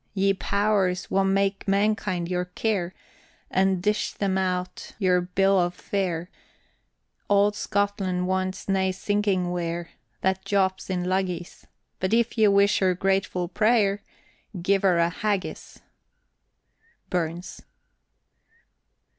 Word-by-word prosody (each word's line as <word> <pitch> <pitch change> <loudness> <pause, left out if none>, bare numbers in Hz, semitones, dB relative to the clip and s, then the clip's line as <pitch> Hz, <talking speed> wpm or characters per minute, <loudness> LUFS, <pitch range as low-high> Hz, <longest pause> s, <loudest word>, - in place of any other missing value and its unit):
Ye 195 0 +3
powers 195 -2 0
wha 195 - +3
mak 195 +1 0
mankind 200 -3 +1
your 180 0 -1
care, 185 -1 -2 0.6
And 190 -1 +2
dish 210 +1 0
them 195 -2 -1
out 180 -1 -2
their 180 -3 +3
bill 195 +2 +2
of 175 0 0
fare, 180 -3 -3 1.0
Auld 205 0 +4
Scotland 200 -3 -1
wants 185 0 -2
nae 190 -1 +1
skinking 190 -1 0
ware 170 -1 -3 0.3
That 190 0 0
jaups 190 -1 0
in 180 -1 -1
luggies, 180 -1 -2 0.3
But 190 +4 +1
if 235 0 +1
ye 220 -2 +5
wish 200 +1 +4
her 185 -2 +2
grateful 190 -1 0
pray'r, 205 +1 +2 0.6
Gie 195 +3 +2
her 185 -3 +3
a 170 0 +2
Haggis. 200 0 -3 1.3
BURNS. 175 0 -3
190 Hz, 115 wpm, -25 LUFS, 180-200 Hz, 1.3 s, ye